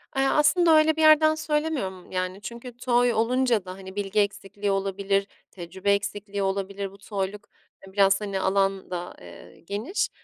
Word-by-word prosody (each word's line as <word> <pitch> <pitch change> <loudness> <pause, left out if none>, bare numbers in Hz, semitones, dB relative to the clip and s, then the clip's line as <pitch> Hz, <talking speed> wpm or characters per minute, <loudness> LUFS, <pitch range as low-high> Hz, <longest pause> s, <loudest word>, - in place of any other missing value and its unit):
Eee, 270 0 +2
aslında 315 +3 +4
öyle 310 0 +4
bir 320 - -1
yerden 310 0 +6
söylemiyorum. 300 - -2
Yani, 185 +1 -3
çünkü 235 +2 -9
toy 245 -1 +2
olunca 235 -2 +1
da, 185 - -7
hani, 190 0 -11
bilgi 205 0 -1
eksikliği 200 0 -1
olabilir, 195 0 0 0.2
tecrübe 190 +2 -3
eksikliği 200 0 -3
olabilir. 195 0 -3
Bu 195 - -15
toyluk, 200 0 -5 0.4
eee, 190 - -15
biraz, 195 0 +4
hani, 200 -2 -3
alan 195 0 0
da, 175 0 -5
eee, 90 0 -13
geniş. 205 - -2
200 Hz, 160 wpm, -25 LUFS, 195-245 Hz, 0.4 s, yerden